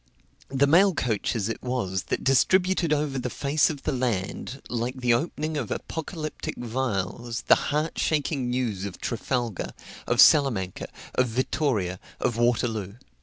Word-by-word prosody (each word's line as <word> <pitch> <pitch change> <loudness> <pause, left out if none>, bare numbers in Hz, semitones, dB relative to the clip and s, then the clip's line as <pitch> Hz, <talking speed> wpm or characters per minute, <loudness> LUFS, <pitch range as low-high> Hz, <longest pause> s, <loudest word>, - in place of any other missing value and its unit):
The 135 +1 +3
mail 180 +5 +5
coaches 110 -3 -1
it 115 - -4
was 110 -7 -2
that - - -2
distributed 180 +5 +3
over 145 -3 0
the 125 0 -3
face 140 +4 +2
of 145 -3 -6
the - - 0
land, 125 0 -2
like 125 +2 -3
the 125 -1 +3
opening 155 +3 -1
of 125 -7 -3
apocalyptic 160 -1 -5
vials, 120 -1 -3
the - - +4
heart 150 +3 -1
shaking 145 -4 0
news 120 -6 -1
of 100 -2 -6
Trafalgar, 120 -3 -2 0.3
of - - 0
Salamanca, 115 -11 +5 0.3
of 125 - +2
Vittoria, 115 - 0 0.2
of 120 - 0
Waterloo. 115 -4 0
125 Hz, 140 wpm, -26 LUFS, 115-145 Hz, 0.3 s, mail